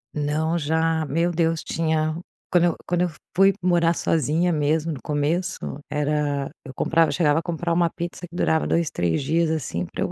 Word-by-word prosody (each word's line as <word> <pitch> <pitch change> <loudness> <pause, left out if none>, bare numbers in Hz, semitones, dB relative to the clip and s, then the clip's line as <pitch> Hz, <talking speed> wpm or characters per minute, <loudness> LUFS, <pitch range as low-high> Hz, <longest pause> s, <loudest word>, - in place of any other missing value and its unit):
Não, 155 +3 0
já, 160 +1 +1
meu 170 +3 +1
Deus, 165 -1 0
tinha 155 -1 0 0.4
quando 175 -1 +4
eu 170 - +1
quando 175 0 +1
eu 180 - +2 0.3
fui 195 +1 +6
morar 170 -2 +3
sozinha 165 +3 +1
mesmo, 155 +2 +1
no 145 - -5
começo, 155 +8 -1 0.3
era 145 -1 -1
eu 130 - -9
comprava 165 +4 +2
chegava 155 -3 +2
a - - -3
comprar 170 0 -2
uma 170 0 +3
pizza 175 +2 -6
que 170 - -13
durava 160 -2 +1
2, 170 -2 +1
3 85 +7 0
dias, 165 +3 +1
assim, 105 - -2
para - - -3
eu - - -2
160 Hz, 185 wpm, -23 LUFS, 150-170 Hz, 0.4 s, fui